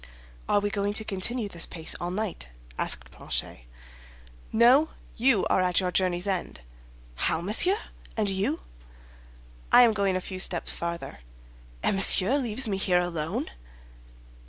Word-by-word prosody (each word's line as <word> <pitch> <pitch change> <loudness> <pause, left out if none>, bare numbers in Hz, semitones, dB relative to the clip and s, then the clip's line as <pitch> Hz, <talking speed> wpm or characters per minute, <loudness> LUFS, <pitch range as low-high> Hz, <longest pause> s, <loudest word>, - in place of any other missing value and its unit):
"Are 205 - +4
we 205 0 -2
going 200 0 -1
to 220 - +1
continue 210 +4 -2
this 170 -4 0
pace 160 -2 -4
all 175 - -3
night?" 190 - -4 0.3
asked 60 +1 -1
Planchet. - - -5 0.9
"No; 255 +7 +5 0.3
you 235 -4 +2
are - - +2
at 180 -1 +2
your 180 -2 -1
journey's 180 0 0
end." 185 - -3 0.5
"How, 110 - 0
monsieur! 220 - +3 0.4
And 215 -2 +1
you?" 190 - -1 1.1
"I 245 - +8
am 230 -2 +4
going 200 -3 0
a - - 0
few 185 0 -7
steps 175 -2 +2
farther." 170 - -6 0.6
"And - - +1
Monsieur 195 +7 +6
leaves 245 0 0
me 195 -2 -1
here 180 -2 +2
alone?" 165 - -3
195 Hz, 145 wpm, -26 LUFS, 175-220 Hz, 1.1 s, I